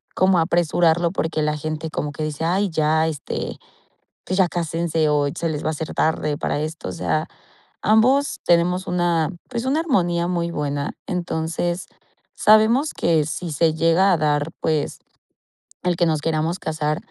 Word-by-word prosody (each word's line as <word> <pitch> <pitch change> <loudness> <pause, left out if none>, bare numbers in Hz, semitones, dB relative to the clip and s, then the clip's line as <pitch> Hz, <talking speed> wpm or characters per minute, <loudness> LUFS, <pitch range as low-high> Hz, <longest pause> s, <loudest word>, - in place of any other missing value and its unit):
como 185 -1 +4
apresurarlo 170 0 +2
porque 160 -4 -1
la 150 0 0
gente 155 +1 -4
como 150 - -3
que 155 +2 -5
dice: 155 0 -4
"Ay, 190 +4 +1
ya, 160 0 +2
este, 155 -3 -4 0.7
pues, 185 - -1
ya 190 - +5
cásense 165 -1 -1
o 145 -1 +2
se 170 - -1
les 155 -2 -3
va - - +1
a - - +1
hacer 155 0 -5
tarde 155 -2 0
para - - -1
esto", 155 +1 -5
o - - -4
sea, 155 -1 -1 0.5
ambos 255 +6 +3
tenemos 175 +2 +2
una, 175 -3 +1 0.2
pues, 235 -1 -3
una 275 +4 +1
armonía 175 - +1
muy 170 -1 -1
buena, 145 -2 -2
entonces, 175 0 -2 0.5
sabemos 220 +8 +4
que 160 -3 +2
si 170 +2 -4
se 160 +2 +2
llega 165 +4 +4
a - - +2
dar, 150 0 +1
pues, 155 -2 -1 0.8
el 175 -1 0
que 175 - +3
nos 155 -2 0
queramos 160 +2 0
casar, 155 -1 -1
165 Hz, 165 wpm, -22 LUFS, 155-180 Hz, 0.8 s, ya